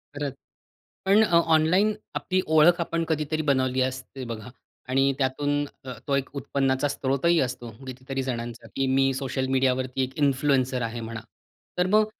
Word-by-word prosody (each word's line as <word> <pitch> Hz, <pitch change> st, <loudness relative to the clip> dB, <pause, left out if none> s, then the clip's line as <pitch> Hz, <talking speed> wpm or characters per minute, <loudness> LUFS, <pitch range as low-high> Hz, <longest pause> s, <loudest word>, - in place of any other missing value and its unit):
खरंच. 145 Hz, -2 st, -3 dB, 0.7 s
पण 200 Hz, +3 st, +5 dB
अ, 170 Hz, -5 st, +4 dB, 0.2 s
ऑनलाईन 180 Hz, +7 st, +3 dB, 0.2 s
आपली 185 Hz, 0 st, 0 dB
ओळख 160 Hz, +3 st, +5 dB
आपण 165 Hz, 0 st, -1 dB
कधीतरी 155 Hz, 0 st, -1 dB
बनवली 130 Hz, -1 st, +1 dB
असते 130 Hz, +1 st, -3 dB
बघा. 110 Hz, +2 st, -7 dB, 0.4 s
आणि 135 Hz, +1 st, +3 dB
त्यातून 145 Hz, +2 st, 0 dB, 0.2 s
अ, 130 Hz, -, -5 dB
तो 140 Hz, -, +2 dB
एक 140 Hz, -1 st, -1 dB
उत्पन्नाचा 135 Hz, 0 st, 0 dB
स्त्रोतही 140 Hz, +5 st, +1 dB
असतो, 125 Hz, -2 st, -3 dB, 0.2 s
कितीतरी 130 Hz, +1 st, -4 dB
जणांचा, 120 Hz, -2 st, -5 dB
की 135 Hz, -1 st, +1 dB
मी 135 Hz, 0 st, +3 dB
सोशल 130 Hz, 0 st, -2 dB
मीडियावरती 130 Hz, 0 st, +1 dB
एक 130 Hz, +1 st, -4 dB
इन्फ्लुएन्सर 130 Hz, -2 st, +2 dB
आहे 115 Hz, +1 st, -6 dB
म्हणा. 115 Hz, 0 st, -6 dB, 0.6 s
तर 180 Hz, +1 st, +2 dB
मग 215 Hz, +2 st, +4 dB
135 Hz, 155 wpm, -26 LUFS, 130-150 Hz, 0.7 s, पण